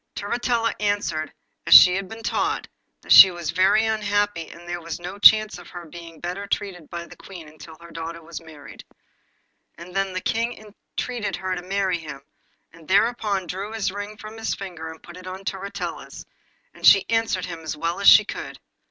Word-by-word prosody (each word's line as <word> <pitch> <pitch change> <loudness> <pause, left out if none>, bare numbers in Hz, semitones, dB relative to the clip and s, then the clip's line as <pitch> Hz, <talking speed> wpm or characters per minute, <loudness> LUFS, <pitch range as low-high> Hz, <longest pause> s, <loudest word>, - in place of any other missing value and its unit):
Turritella 230 +2 -1
answered 205 -7 -1 0.4
as - - +8
she 180 - +10
had 190 0 -3
been 225 0 -10
taught, - - -1 0.3
that - - -9
she 190 - +11
was 175 -3 -5
very 190 +5 +3
unhappy, 205 -5 -1
and 170 - -13
that - - -15
there 175 0 -5
was 170 0 -6
no 180 +3 -8
chance 215 -2 +6
of 175 - -13
her 175 -1 -9
being 165 0 -12
better 180 +3 -5
treated 180 -7 -4
by 170 0 -6
the - - -14
Queen 175 -5 -12
until 155 +1 -13
her 170 0 -14
daughter 165 +1 -7
was 170 +1 -8
married. 155 -4 -13 0.9
And 175 +2 -12
then 195 0 0
the 185 - -2
King 230 +5 -1 0.4
entreated 240 -4 -3
her 185 0 -3
to 180 - -4
marry 190 -1 -1
him; 145 -4 -9 0.5
and 165 -2 -17
thereupon 205 0 +1
he - - -13
drew 195 +5 -6
his 215 -4 -2
ring 205 +2 -7
from 215 +1 -10
his 225 - -2
finger 175 -5 -8
and 160 0 -12
put 175 +1 -12
it 185 0 -11
upon 190 +1 -7
Turritella's, 195 +1 -6 0.5
and - - -18
she 195 -1 +7
answered 225 -5 0
him 170 -2 -7
as 155 -1 -6
well 165 +3 -2
as 200 - +7
she 210 - +8
could. - - -7
185 Hz, 200 wpm, -23 LUFS, 170-205 Hz, 0.9 s, she